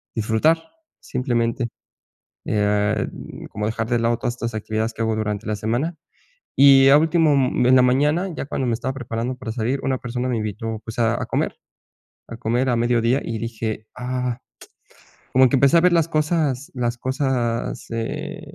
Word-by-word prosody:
disfrutar, 110 +9 +2 0.4
simplemente, 120 -1 -1 0.8
eh, 105 0 +1
mm, - - -10
como 105 0 -3
dejar 110 +1 -2
de 120 - +2
lado 115 0 +1
todas 120 - -3
estas 115 -1 -4
actividades 110 +1 -2
que 115 - -6
hago 110 -1 +1
durante 105 0 -3
la 105 - 0
semana 120 - -2 0.6
y 135 -1 +8
a 140 - +8
último, 160 -1 +3
mm, 130 -2 +2
en 130 - +6
la 130 - +7
mañana, 150 +8 +2
ya - - -4
cuando 135 -2 -2
me 115 - +1
estaba 130 +3 -3
preparando 120 0 -4
para 125 -3 -6
salir, 120 +4 -1
una 130 -1 0
persona 125 +1 -3
me 120 - 0
invitó, 110 +1 -4
pues, 115 +2 -6
a 115 -1 +2
a - - -2
comer - - -1 0.7
a 115 - -7
comer 120 +3 0
a 120 - +2
mediodía, 120 +2 +2
y 115 -1 -3
dije: 110 -1 -4
"Ah". 125 0 -2 0.9
Como 130 0 +6
que 135 - +2
empecé 140 +5 +5
a - - +5
ver 180 -1 +4
las 165 -1 +3
cosas 155 -4 0
las 120 -1 -2
cosas, 130 -3 -1
eh, 115 0 -4
120 Hz, 180 wpm, -22 LUFS, 115-135 Hz, 0.9 s, y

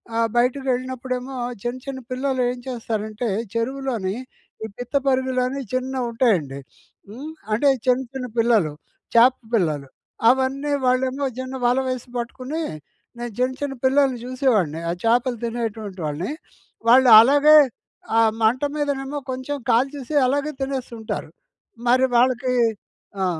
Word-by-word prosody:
ఆహ్, 230 0 +2
బయటకకెళ్ళినప్పుడేమో 255 0 -1 0.3
చిన్న 240 +1 -2
చిన్న 270 -1 -5
పిల్లలు 260 0 -1
ఏం 250 - -3
చేస్తారంటే 225 -2 -3 0.3
చెరువులోని 230 -4 -2 0.5
ఈ - - -4
పిత్త 245 +3 -7
పరిగలని 260 0 0
చిన్నవి 255 0 -1
ఉంటాయండి. 180 - +1 0.5
హ్మ్, 275 +9 -8 0.2
అంటే 255 +7 +3 0.2
చిన్న 255 +1 +3
చిన్న 255 -2 -4
పిల్లలు 220 -10 +3 0.4
చాప 245 +2 +7 0.2
పిల్లలు. 155 -9 +1 0.4
అవన్నీ 265 +3 +1
వాళ్ళేమో 260 +2 +1
చిన్న 260 +1 -5
వల 250 +2 +3
వేసి 255 -1 -3
పట్టుకొని 255 +6 -4 0.6
నేను 240 -1 -5
చిన్న 255 +1 +1
చిన్న 280 -1 -2
పిల్లల్ని 265 -1 +3
చూసేవాడిని. 240 - +1
ఆ - - +1
చాపలు 240 +1 +2
తినేటువంటి 225 -4 -4
వాళ్ళని, 155 - -3 0.6
వాళ్ళు 255 +1 +7
అలాగే 290 +6 +7 0.6
ఆ - - +6 0.2
మంట 225 +4 +3
మీదనేమో 285 -1 -2
కొంచెం 260 +3 -4
కాల్చేసి 270 +4 0
అలాగే 285 +3 0
తినేస్తుంటారు. 255 -5 -4 0.6
మరి 255 +2 +5
వాళ్ళకి 250 +1 +2 0.7
ఆ! - - +2
255 Hz, 120 wpm, -22 LUFS, 230-265 Hz, 0.7 s, చాప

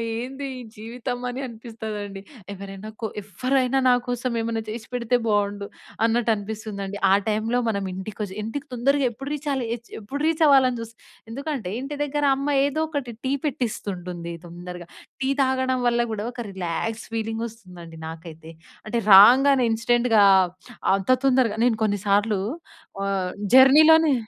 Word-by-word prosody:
ఏంది 265 +4 -5
ఈ - - -7
జీవితం 240 +3 -5
అని 245 +1 -5
అనిపిస్తదండి. 220 -4 -7 0.3
ఎవరైనా 195 +2 -8
కొ 225 - -1 0.2
ఎవ్వరైనా 255 +6 0
నాకోసం 245 0 0
ఏమన్నా 225 0 -2
చేసిపెడితే 235 +2 -2
బావుండు 205 -1 0 0.4
అన్నట్టు 230 0 +2
అనిపిస్తుందండి. 205 -1 -6
ఆ - - +7
టైంలో 220 +3 0
మనం 200 -2 -1
ఇంటికొచ్చి 195 +1 -6
ఇంటికి 280 +6 -5
తొందరగా 275 +3 +2
ఎప్పుడు 270 +5 -8
రీచాలి 275 -4 -2 0.3
ఎప్పుడు 220 +7 -6
రీచ్ 325 0 +2
అవ్వాలని 260 -3 +5
చూస్తాం. 230 0 -10 0.3
ఎందుకంటే 275 - -4
ఇంటి 285 +2 -5
దగ్గర 290 0 -2
అమ్మ 275 - -3 0.2
ఏదో 285 +2 -1
ఒకటి 285 -6 -4
టీ 260 - +1
పెట్టిస్తుంటుంది 185 - -4
తొందరగ. 175 +1 -8 0.4
టీ 265 0 -1
తాగడం 260 -1 +1
వల్ల 240 0 +2
కూడా 210 -1 -3
ఒక 245 - -12
రిలాక్స్ 190 +5 -3
ఫీలింగ్ 225 0 -2
వస్తుందండి 180 -7 -12
నాకైతే. 160 0 -10 0.4
అంటే 215 +2 -2 0.2
రాంగానే 255 +7 +8
ఇన్స్టెంట్‌గా 230 -1 +3 0.7
అంత 195 +3 -5 0.2
తొందరగా 250 -5 +3
నేను 230 -3 +2
కొన్నిసార్లు 205 0 +1 0.7
ఆహ్, 190 -2 -1 0.2
జర్నీలోనే 305 +4 +7
225 Hz, 130 wpm, -24 LUFS, 200-260 Hz, 0.7 s, రాంగానే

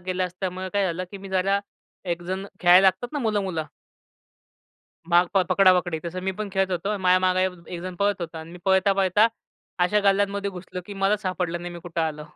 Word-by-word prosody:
गेलं 185 0 0
असल्यामुळं 185 +1 -5
काय 200 -1 +2
झालं 180 +1 -3
की 200 - -8
मी 195 0 -10
जरा 190 +1 +1 0.5
एकजण 180 +3 -3
खेळायला 180 +2 +7
लागतात 190 - +1
ना 295 - -2
मुलं, 215 -5 0
मुलं? 165 -5 -3 1.4
माग 175 +1 +5
प - - +5
पकडापकडी 180 -4 +4
तसं 180 +2 -4
मी 190 - 0
पण 210 -1 -3
तसं 195 - -14
खेळत 190 0 +1
होतो 200 +4 -1
माझ्या 185 0 +4
मागे 185 0 +2
एक 190 - -1 0.2
एकजण 180 +1 -6
पळत 200 -1 0
होता 165 -1 -5
आणि 160 +1 -9
मी 180 - -10
पळता-पळता 195 +2 +4 0.6
अशा 210 +4 +2
गल्ल्यांमध्ये 200 0 +2
घुसलो 180 0 -7
की 205 - -7
मलाच 195 +2 +1
सापडलं 180 -2 -2
नाही 175 0 -6
मी - - -7
कुठं 170 0 -4
आलो? 155 -2 -2
185 Hz, 200 wpm, -24 LUFS, 175-195 Hz, 1.4 s, खेळायला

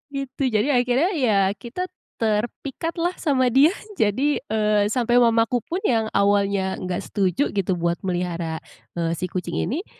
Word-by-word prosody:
gitu. 275 0 -5
Jadi 215 +6 +2
akhirnya 250 +7 +2
ya, 250 -9 +2 0.2
kita 275 +10 -4 0.3
terpikatlah 275 +10 -1
sama 270 -5 +2
dia. 280 +4 +6 0.3
Jadi, 260 +8 +1
eee, 210 -1 +2
sampai 245 0 +3
mamaku 230 0 +3
pun 345 - -4
yang 225 -3 +1
awalnya 200 -1 +2
nggak 180 -1 -3
setuju 195 - +1
gitu, 190 -2 0
buat 170 0 -1
melihara, 175 -3 -2 0.4
eee, 165 -1 0
si 180 +1 -4
kucing 180 -2 -4
ini 325 - -2
220 Hz, 145 wpm, -23 LUFS, 190-260 Hz, 0.4 s, dia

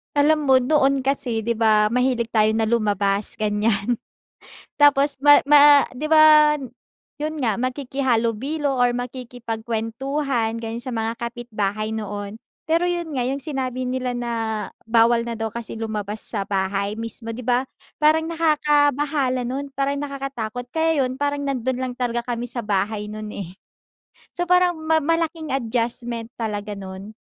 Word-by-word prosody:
Alam 300 +1 +3
mo 260 -1 +5
noon 275 0 +2
kasi 255 -4 -1
di 230 +1 -2
ba 215 -2 +4
mahilig 250 -1 0
tayo 220 -1 +3
na 220 -1 0
lumabas, 205 -3 +1
ganyan. 210 +1 0 0.8
Tapos 285 -1 +4
ma 290 0 +8
ma 290 -1 +7
di 275 - -7
ba 310 -1 +7
n 265 - -7 0.5
yun 305 +1 -4
nga, 230 -6 +1
makikihalubilo 265 +1 -1
or 245 0 +4
makikipagkuwentuhan, 240 +1 -3
gano'n 230 0 -5
sa 255 - -5
mga 225 0 -3
kapitbahay 215 -3 -3
noon. 205 -1 -5 0.2
Pero 335 +3 +1
yun 345 -2 -2
nga 250 - 0
yung 270 +1 -3
sinabi 260 -4 -3
nila 250 -1 -2
na 240 -1 -3 0.5
bawal 230 +1 +3
na 235 - -3
daw 225 0 -2
kasi 235 0 -6
lumabas 215 -2 -4
sa 200 -3 -4
bahay 195 +1 -1
mismo, 230 0 -3
di 250 - -7
ba? 250 +2 +1 0.3
Parang 310 +1 +4
nakakabahala 295 -4 +1
nun, 270 +4 -4
parang 275 +1 -1
nakakatakot. 275 -5 -5
Kaya 320 -3 +1
yun 255 +1 -4
parang 285 0 -1
nandun 260 -2 -1
lang 255 -1 -2
talaga 240 -1 -2
kami 240 +1 -4
sa 240 0 -3
bahay 210 +1 -1
nun, 215 0 -7
eh. 185 -4 -6 0.8
So, 350 - -1
parang 360 0 +3
ma 320 0 +3
malaking 320 0 -1
adjustment 235 -1 -2
talaga 210 -2 -4
nun. 195 +2 -9
245 Hz, 145 wpm, -22 LUFS, 225-285 Hz, 0.8 s, ma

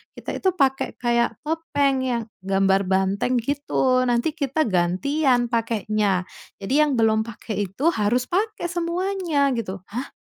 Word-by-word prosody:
kita - - -6
itu 375 -2 +1
pakai 270 -5 +1
kayak 235 -2 0
topeng 295 -4 0
yang 235 -2 -1 0.2
gambar 195 0 +1
banteng 195 +6 +1
gitu, 260 0 +1
nanti 240 +6 +1
kita 295 0 0
gantian 240 - +1
pakainya. 215 -4 0 0.3
Jadi 195 - -7
yang 300 -3 +3
belum 220 -2 +3
pakai 215 -3 -4
itu 275 - +1
harus 235 -1 +1
pakai 420 +4 -1
semuanya," 345 -4 0
gitu. 195 -4 -6
"Hah, 250 +6 -4
245 Hz, 135 wpm, -23 LUFS, 205-295 Hz, 0.3 s, yang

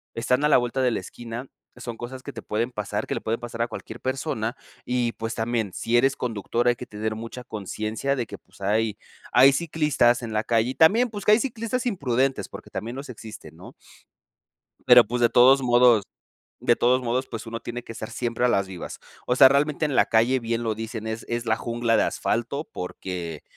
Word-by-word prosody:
Están 125 +4 +1
a 150 - +3
la - - +6
vuelta 120 +2 -1
de 125 - +3
la - - -1
esquina, 120 +6 -8 0.3
son 120 -2 -7
cosas 130 +2 -7
que 140 - -7
te - - -7
pueden 115 +4 -2
pasar, 105 -2 -3
que - - -2
le - - -2
pueden 115 +1 -2
pasar 115 -1 -5
a 115 - +1
cualquier 115 -1 -8
persona 130 -4 -2 0.3
y 125 -1 0
pues 115 +1 -5
también, 115 -4 -1
si 120 +1 +1
eres 135 +3 +3
conductor 120 +1 -1
hay 120 - +2
que 125 - -7
tener 110 0 -3
mucha 115 +3 -7
consciencia 110 +4 -3
de 125 -3 -2
que 100 - -8
pues 95 +1 -23
hay 105 +1 0 0.4
hay 135 +2 +8
ciclistas 150 -6 +2
en 115 - -5
la 110 0 0
calle 115 +1 +2
y - - -8
también 225 +10 +5
pues 205 -2 -7
que 210 - +6
hay 215 - +5
ciclistas 250 0 -3
imprudentes 135 - 0
porque - - -10
también 115 +3 -5
los 140 +1 -7
existen, 110 -2 -10
¿no? - - -12 1.1
Pero 125 -1 +9
pues 120 +3 -2
de 120 - +5
todos 130 +3 +6
modos 120 -3 +5 0.6
de 120 - +3
todos 125 +2 +3
modos 125 +2 -1
pues 115 0 -7
uno 115 0 -5
tiene 120 +1 -6
que - - -9
estar 110 -1 -7
siempre 120 0 -3
a - - +5
las 100 -5 +1
vivas. 90 -3 -8 0.3
O 125 - +2
sea 135 0 +9
realmente 150 +2 +1
en 145 - -1
la - - +5
calle 120 +4 +3
bien 115 0 -2
lo 110 -1 0
dicen 110 0 -6
es 110 +1 -5
es 120 0 -2
"la 110 -1 +2
jungla 115 0 0
de - - +4
asfalto" 120 +6 -1
porque 90 -3 -6
120 Hz, 215 wpm, -25 LUFS, 110-130 Hz, 1.1 s, Pero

